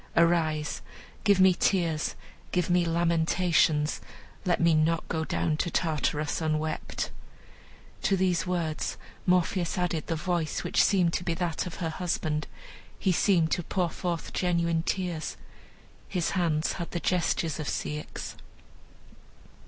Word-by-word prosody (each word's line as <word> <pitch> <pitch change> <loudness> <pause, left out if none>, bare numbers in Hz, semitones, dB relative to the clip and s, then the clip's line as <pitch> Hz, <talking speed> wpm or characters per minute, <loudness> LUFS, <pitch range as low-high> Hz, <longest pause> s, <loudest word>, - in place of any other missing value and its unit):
Arise! 160 -3 +2 0.4
give 200 -2 +4
me 190 0 +7
tears, 170 -4 +1 0.4
give 180 0 +1
me 175 -1 +4
lamentations, 165 -2 +2 0.4
let 175 -2 +2
me 170 -1 +4
not 160 +1 +2
go 160 -1 -1
down 155 0 0
to 175 - -1
Tartarus 155 -2 0
unwept." 155 0 -2 0.9
To 195 - +2
these 185 -1 +1
words 170 -4 -1 0.3
Morpheus 180 0 +2
added 175 -3 -1
the 165 - 0
voice, 170 -1 -1
which - - +3
seemed 180 -4 +3
to - - -1
be 170 -1 -1
that 175 0 -2
of 175 - -6
her 165 -2 -2
husband; 155 -3 -2 0.5
he 190 - +1
seemed 170 -2 +3
to - - +1
pour 175 0 -1
forth 175 -1 -3
genuine 170 -2 +1
tears; 175 -2 -2 0.7
his 180 -4 0
hands 165 -4 +1
had 170 -2 -5
the 175 - -3
gestures 170 -3 0
of 150 - -3
Ceyx. 150 0 -4
170 Hz, 135 wpm, -28 LUFS, 160-180 Hz, 0.9 s, me